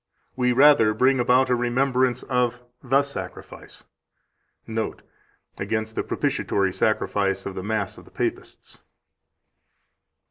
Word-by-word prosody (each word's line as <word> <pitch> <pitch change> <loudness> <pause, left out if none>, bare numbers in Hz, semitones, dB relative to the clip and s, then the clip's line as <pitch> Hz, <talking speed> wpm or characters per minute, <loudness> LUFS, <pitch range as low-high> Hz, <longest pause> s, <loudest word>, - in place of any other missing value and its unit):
We 125 -1 +1
rather 130 -5 +5
bring 130 +3 +3
about 125 +1 +3
a - - +4
remembrance 125 +1 +1
of 125 -1 -1 0.2
the 135 +2 +2
sacrifice." 140 0 -9 0.8
(Note: 110 0 -4 0.6
Against 110 0 -2
the - - -1
propitiatory 95 -2 -1
sacrifice 100 -2 0
of 100 - -4
the 95 - -5
Mass 105 -1 -3
of - - -16
the - - -17
Papists.) - - -5
120 Hz, 115 wpm, -24 LUFS, 110-130 Hz, 0.8 s, rather